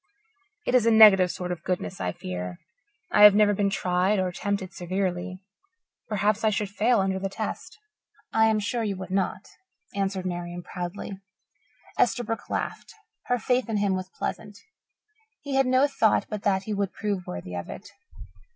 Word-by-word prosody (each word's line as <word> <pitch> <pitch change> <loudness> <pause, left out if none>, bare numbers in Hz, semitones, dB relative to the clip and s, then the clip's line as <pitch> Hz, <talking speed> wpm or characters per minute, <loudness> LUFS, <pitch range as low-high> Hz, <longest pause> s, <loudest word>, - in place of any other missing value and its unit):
"It - - -1
is 245 -3 +4
a - - +7
negative 205 -5 +8
sort 180 0 -4
of 175 -2 -4
goodness, 185 0 -3
I 90 - -1
fear. 90 0 -6 0.5
I 210 - +4
have 210 -1 +10
never 210 0 +5
been 200 0 +1
tried 185 +2 +1
or 185 -1 0
tempted 190 +1 -3
severely. 185 0 -3 0.7
Perhaps 210 +1 +1
I 220 - +4
should 205 -1 -1
fail 225 +3 +2
under 190 0 -1
the 195 0 -3
test." 195 - -5 0.6
"I 220 0 +5
am 220 -1 +2
sure 230 +3 -2
you 200 -3 -2
would 185 0 -7
not," 190 0 -1 0.5
answered 195 -1 -2
Marian 175 -1 -4
proudly. 180 +2 -6 0.8
Esterbrook 225 -3 0
laughed; - - -4 0.3
her 245 - +1
faith 250 +1 0
in 220 - 0
him 200 -1 +1
was 185 0 -5
pleasant. 205 +1 -5 0.9
He 285 -1 -4
had 270 -1 +3
no 255 +2 +4
thought 225 -6 +2
but 210 -2 -5
that 195 -2 +1
he 215 - -4
would 200 -1 -2
prove 200 -4 -3
worthy 90 0 -6
of 90 0 -5
it. 200 - -9
200 Hz, 170 wpm, -26 LUFS, 185-215 Hz, 0.9 s, have